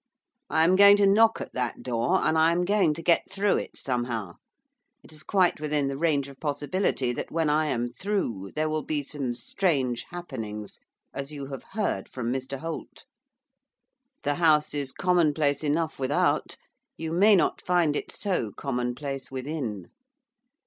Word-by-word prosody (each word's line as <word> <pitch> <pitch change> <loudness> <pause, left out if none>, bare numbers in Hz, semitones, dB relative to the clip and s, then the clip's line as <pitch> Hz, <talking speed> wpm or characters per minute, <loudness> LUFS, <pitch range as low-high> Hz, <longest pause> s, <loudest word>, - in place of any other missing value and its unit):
I 160 - +3
am 180 +3 +5
going 200 +1 +8
to 205 - +4
knock 220 +3 +5
at - - -7
that 125 -2 -3
door, 125 +10 +1
and 160 - +2
I 160 +1 +4
am 175 +1 +1
going 190 -6 +2
to 165 - -8
get 170 +1 +4
through 200 +1 +2
it, - - -6
somehow. 120 -7 -3 0.7
It - - -16
is 155 - -11
quite 185 -6 +2
within 150 -2 0
the 135 - -3
range 145 -2 +1
of 140 -1 -13
possibility 145 -3 -1
that, - - -5
when 160 -2 +1
I 155 +1 +2
am 120 -4 -1
through, 120 - -3
there 155 +1 0
will 155 0 -1
be 150 -1 -2
some 135 -4 -4
strange 130 -3 -1
happenings, 110 - -7 0.3
as 140 +1 -5
you 145 -2 -6
have 135 - -5
heard 205 - -1
from 120 -1 -3
Mr 135 +1 -4
Holt. 165 +4 -7 1.2
The 145 - +1
house 155 -2 +4
is 140 -2 -3
commonplace 155 -4 +1
enough 155 +1 -1
without; 135 +2 0 0.4
you 160 -1 -4
may 200 +5 +5
not 180 - +1
find 175 -4 +2
it - - -4
so 180 - -1
commonplace 135 +3 -3
within. 130 - -5
150 Hz, 165 wpm, -27 LUFS, 130-170 Hz, 1.2 s, going